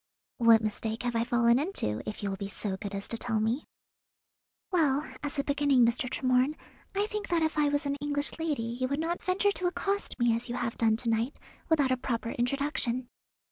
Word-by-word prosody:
"What 230 -2 +6
mistake 220 +1 -2
have 240 -1 -1
I 230 - +2
fallen 235 0 +3
into, 275 - 0
if 210 - -7
you 200 - -1
will 195 - -4
be 200 - -4
so 200 -1 -4
good 200 +1 -6
as 200 - -5
to 230 - -1
tell 225 -2 0
me?" 225 +7 0 1.1
"Well, 300 -5 +2 0.2
as 290 0 -4
a 280 - +1
beginning, 285 -3 +3
Mr. 240 +2 +1
Tremorne, 255 +3 +2 0.4
I 405 +1 +2
think 420 -1 -4
that 340 -2 +2
if 315 - 0
I 300 -1 +3
was 290 +1 0
an 280 0 -1
English 290 +1 -1
lady 305 -7 -1 0.2
you 255 - +2
would 280 +3 -1
not 335 +2 -2
venture 385 +2 +2
to 365 -2 -1
accost 395 +3 -1
me 240 -2 +3
as 230 +1 -5
you 240 - -2
have 235 -2 -2
done 220 -1 +2
to 235 0 -2
night, 225 +4 0 0.3
without 290 -5 +3
a 255 - +2
proper 235 -2 -2
introduction." 250 -1 0
255 Hz, 215 wpm, -29 LUFS, 230-295 Hz, 1.1 s, What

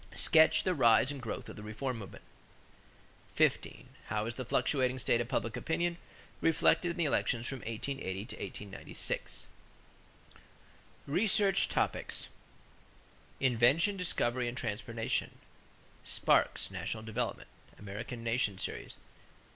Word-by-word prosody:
Sketch 160 0 +6
the 185 - +1
rise 125 -2 +5
and 140 -2 -6
growth 115 - -5
of - - -8
the - - -9
reform 115 +4 -4
movement. 100 - -10 1.1
15. - - +1 0.2
How 105 +1 -1
is 115 - -3
the 130 - -5
fluctuating 130 +1 +1
state 120 -1 +2
of 120 - -3
public 115 -2 -1
opinion 170 +1 -1 0.4
reflected 165 +2 +3
in 170 - -4
the 170 - +1
elections 120 -4 +1
from 135 - 0
1880 110 -4 -4
to 125 - -7
1896? 100 -2 -4 1.6
=Research 200 +5 +3
Topics= - - -1 1.1
=Invention, 135 - +3
Discovery, 125 -9 0
and 120 +2 -4
Transportation.= 115 -1 -2 0.7
Sparks, - - +1
National 110 -1 -4
Development 110 -1 -3 0.3
(American 110 +4 -7
Nation 115 -4 0
Series), - - -5
pp. - - -20
120 Hz, 120 wpm, -32 LUFS, 110-145 Hz, 1.6 s, Sketch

